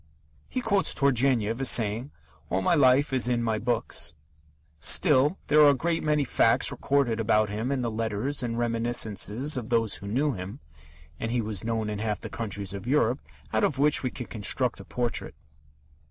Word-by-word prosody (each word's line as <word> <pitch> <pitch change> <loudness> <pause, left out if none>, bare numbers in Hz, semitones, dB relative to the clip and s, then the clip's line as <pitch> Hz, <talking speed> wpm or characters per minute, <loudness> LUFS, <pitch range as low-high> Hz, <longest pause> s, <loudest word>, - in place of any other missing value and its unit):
He 255 - -3
quotes 200 -4 +1
Turgenev 125 -4 +1
as 135 - +3
saying: 115 +4 +2 0.4
"All 95 +1 -1
my - - +2
life 140 -1 +3
is 125 -2 +2
in 120 -1 0
my 110 -2 -1
books." 120 -8 -1 0.6
Still, 150 - +3
there 150 +1 +4
are 145 - +8
a - - +5
great 165 +5 -1
many 150 -2 +1
facts - - +2
recorded 135 -5 0
about 110 -1 +2
him 110 +6 -3
in 135 -3 -1
the 120 - -2
letters 115 +5 -2
and 115 -2 -3
reminiscences 120 +2 0
of 120 -2 -5
those 115 -3 +1
who 100 - -10
knew 135 +8 0
him 95 -1 -7 0.6
(and 115 - -3
he 120 +1 0
was 105 -5 -3
known 110 -1 -2
in 105 -1 -4
half 105 -1 -2
the - - -8
countries 100 -4 -4
of 100 +3 -7
Europe), 130 -2 +1 0.3
out 110 - +1
of 140 - +1
which 145 +2 +3
we 130 - -2
can 125 0 -7
construct 115 +4 -1
a - - -11
portrait. 120 - -3
120 Hz, 185 wpm, -26 LUFS, 110-135 Hz, 0.6 s, are